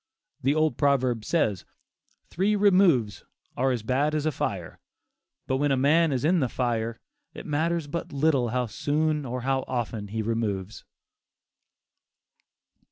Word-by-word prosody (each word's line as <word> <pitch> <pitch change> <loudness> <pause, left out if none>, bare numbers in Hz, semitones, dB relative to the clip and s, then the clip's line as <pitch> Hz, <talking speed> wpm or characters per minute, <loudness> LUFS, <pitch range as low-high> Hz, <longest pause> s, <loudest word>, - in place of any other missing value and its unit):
The 140 +2 +2
old 155 0 +1
proverb 130 -6 +1
says, 105 - 0 0.6
"Three 200 +4 0
removes 180 - +3 0.3
are 130 +2 +1
as 120 -4 -1
bad 140 +6 +1
as 150 0 -1
a 155 - +2
fire," - - -4 0.7
but 130 - 0
when 145 +1 +1
a 135 - +2
man 155 +4 +3
is 130 +1 -1
in 175 +3 +3
the 130 -5 0
fire, 115 -2 -2 0.4
it - - -8
matters 165 +2 0
but 165 +4 -5
little 140 -4 +1
how 125 +2 0
soon 150 +4 -1
or 125 +1 -4
how 135 +1 0
often 115 -4 -3
he 110 +2 -3
removes. 105 -3 -3
135 Hz, 145 wpm, -26 LUFS, 120-155 Hz, 0.7 s, removes